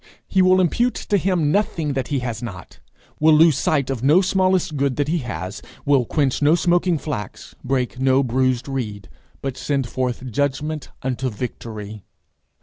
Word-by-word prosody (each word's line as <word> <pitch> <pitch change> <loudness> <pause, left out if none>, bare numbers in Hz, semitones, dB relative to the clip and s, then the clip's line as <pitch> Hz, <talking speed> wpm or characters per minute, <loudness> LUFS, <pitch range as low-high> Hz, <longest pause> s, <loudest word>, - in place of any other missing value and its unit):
He 190 - +2
will 185 0 +5
impute 235 +8 +2
to 205 - -1
him 175 -5 +1
nothing 165 -6 0
that 135 -2 -2
he 140 -3 -1
has 120 -3 -4
not, 100 -7 -8 0.4
will 155 0 +6
lose 160 -1 +6
sight 140 -2 0
of 130 -4 -3
no 145 +7 +5
smallest 185 -3 +1
good 140 -2 0
that 145 -1 0
he 170 +3 0
has; 95 - -5 0.2
will 140 -3 +3
quench 140 +1 0
no 150 +3 +5
smoking 175 0 +2
flax, 140 -10 -6
break 125 -1 -1
no 130 +1 +3
bruised 130 0 0
reed, 105 - -4 0.3
but 135 -2 -3
send 140 -4 -1
forth 130 0 -3
judgment 145 +4 -2
unto 130 0 -1
victory. 110 -2 -7
135 Hz, 165 wpm, -21 LUFS, 125-160 Hz, 0.4 s, will